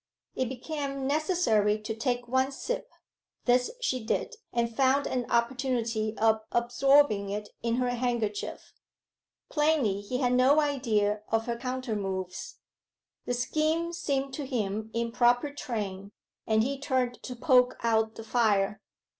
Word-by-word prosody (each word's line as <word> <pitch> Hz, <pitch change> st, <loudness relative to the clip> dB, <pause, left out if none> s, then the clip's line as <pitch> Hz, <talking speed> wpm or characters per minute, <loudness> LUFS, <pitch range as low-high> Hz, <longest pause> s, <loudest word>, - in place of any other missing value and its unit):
It 260 Hz, -2 st, -1 dB
became 275 Hz, +1 st, -4 dB
necessary 275 Hz, -, +2 dB
to 215 Hz, +1 st, -5 dB
take 245 Hz, +1 st, -1 dB
one 260 Hz, +2 st, +1 dB
sip. -, -, -4 dB, 0.6 s
This 250 Hz, 0 st, +3 dB
she 255 Hz, -, -1 dB
did, 465 Hz, -, -1 dB, 0.2 s
and 235 Hz, -1 st, -1 dB
found 270 Hz, +2 st, +3 dB
an 250 Hz, -2 st, -2 dB
opportunity 235 Hz, -3 st, 0 dB
of 220 Hz, 0 st, +3 dB
absorbing 240 Hz, -3 st, +3 dB
it 210 Hz, +1 st, -4 dB
in 230 Hz, 0 st, 0 dB
her 250 Hz, 0 st, +1 dB
handkerchief. 235 Hz, -4 st, -2 dB, 0.8 s
Plainly 295 Hz, -10 st, +2 dB
he 225 Hz, +5 st, -3 dB
had 250 Hz, -2 st, +1 dB
no 260 Hz, +4 st, +5 dB
idea 225 Hz, -8 st, +1 dB
of 225 Hz, 0 st, +1 dB
her 235 Hz, -, -2 dB
countermoves. 210 Hz, -7 st, -4 dB, 0.7 s
The 245 Hz, -, 0 dB
scheme 315 Hz, +6 st, 0 dB
seemed 275 Hz, -5 st, -2 dB
to 285 Hz, +1 st, -4 dB
him 215 Hz, -4 st, -2 dB
in 230 Hz, 0 st, -2 dB
proper 245 Hz, +4 st, +3 dB
train, 205 Hz, -7 st, -5 dB, 0.3 s
and 220 Hz, 0 st, +3 dB
he 275 Hz, +2 st, -2 dB
turned 255 Hz, -3 st, -1 dB
to 250 Hz, -, -6 dB
poke 250 Hz, 0 st, +4 dB
out 220 Hz, -1 st, +2 dB
the 225 Hz, -, -8 dB
fire. 210 Hz, -3 st, +1 dB
245 Hz, 140 wpm, -28 LUFS, 220-270 Hz, 0.8 s, no